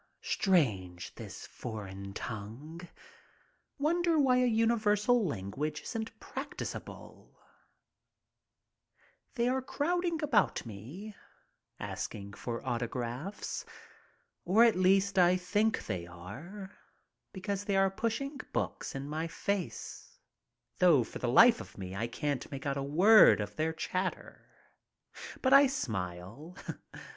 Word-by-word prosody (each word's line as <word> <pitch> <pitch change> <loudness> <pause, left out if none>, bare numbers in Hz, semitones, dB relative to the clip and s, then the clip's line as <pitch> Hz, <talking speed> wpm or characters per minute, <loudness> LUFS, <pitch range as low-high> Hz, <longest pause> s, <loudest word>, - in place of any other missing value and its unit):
Strange, 100 - +1
this - - -9
foreign 100 -4 -7
tongue. 120 - -7 1.0
Wonder 335 +3 +2
why 265 -4 +4
a 250 0 +4
universal 225 0 +3
language 145 - -3
isn't 225 -1 -5
practicable? - - -8 2.0
They 240 -2 +1
are 260 +1 +1
crowding 335 +4 -1
about 300 - +2
me, 135 - -9 0.6
asking 100 0 -5
for 115 +3 -5
autographs. 125 - -3 0.8
Or 205 +6 +5
at 235 -2 +5
least 190 +1 +3
I 180 0 +5
think 205 +5 0
they 90 -5 -4
are, 145 - -9 0.6
because 200 +1 -4
they 200 -2 0
are 195 0 +4
pushing 235 +7 -2
books - - -2
in 135 +1 -4
my 155 +2 -2
face, 200 - -4 0.6
though 170 -9 +6
for - - -8
the 125 - -1
life 230 - +7
of - - -12
me 95 -1 -6
I 110 +4 -1
can't 145 +3 -3
make 135 0 -7
out 140 -1 0
a 140 - -2
word 180 - +7
of 105 0 -4
their 160 +1 0
chatter. 185 +3 -4 0.9
But 260 0 +4
I 280 0 +9
smile. 110 - -5
175 Hz, 115 wpm, -31 LUFS, -, 2.0 s, I